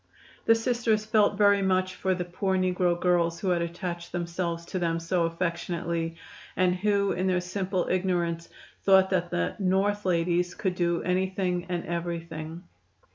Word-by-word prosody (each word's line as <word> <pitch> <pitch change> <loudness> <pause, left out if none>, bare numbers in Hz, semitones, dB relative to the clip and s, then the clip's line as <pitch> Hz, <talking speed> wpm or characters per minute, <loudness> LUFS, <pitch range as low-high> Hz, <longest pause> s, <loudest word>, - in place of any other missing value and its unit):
The 225 - +6
Sisters 225 -2 +1
felt 215 -2 +3
very 200 -1 +5
much 185 -1 +1
for 185 0 0
the 180 -1 -3
poor 190 +2 -1
negro 180 -1 +1
girls 170 -2 +2
who 190 - -1
had 175 -1 +2
attached 170 0 -4
themselves 170 -1 -3
to 185 - -3
them 165 -1 0
so 170 +1 0
affectionately, 170 -1 -2 0.4
and 185 -1 +3
who 200 +1 +1
in 185 +1 -1
their 185 -1 +2
simple 185 0 -2
ignorance 175 -3 0 0.3
thought 190 -1 +5
that 175 -2 +1
the 85 - -1
"North 200 +2 +1
ladies" 175 0 +1
could 190 -3 -1
do 175 -1 0
anything 185 -1 0
and 175 -1 -2
everything. 170 -1 -5
180 Hz, 155 wpm, -27 LUFS, 170-190 Hz, 0.4 s, The